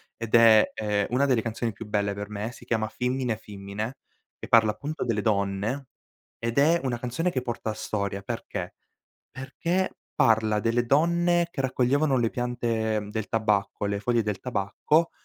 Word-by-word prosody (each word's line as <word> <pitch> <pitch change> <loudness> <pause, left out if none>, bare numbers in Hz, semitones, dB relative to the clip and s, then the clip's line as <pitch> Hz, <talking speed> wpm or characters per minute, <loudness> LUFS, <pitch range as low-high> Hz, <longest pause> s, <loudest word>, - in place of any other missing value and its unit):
ed 115 0 -1
è, 115 -2 +7
ehm, 105 -2 0
una 130 +3 +2
delle 130 -5 +2
canzoni 115 +1 -2
più 105 +2 -9
belle 100 -1 0
per 100 +1 -6
me 105 +2 -4
si 120 - -14
chiama 110 -2 0
Fimmine 125 -1 -1
Fimmine, 105 +4 -6 0.4
e - - -8
parla 110 -2 +5
appunto 150 +8 -5
delle 115 -4 0
donne, 105 +5 -1 0.5
ed 115 +3 -1
è 165 +4 +4
una 120 -2 -1
canzone 125 +9 -1
che 130 - -1
porta 115 -3 -3
storia 100 -2 -3
perché? - - -5 0.6
Perché 170 +8 -2 0.2
parla 110 -1 +3
delle 120 +2 +1
donne 170 +4 +3
che 145 - -5
raccoglievano 135 +2 +2
le 115 -2 +1
piante, 115 -3 -1
mhmm, 105 0 -8
del 110 -1 -3
tabacco, 105 -2 0
le 100 0 -1
foglie 120 +1 +1
del 105 -3 -2
tabacco 125 - 0
115 Hz, 165 wpm, -26 LUFS, 105-130 Hz, 0.6 s, è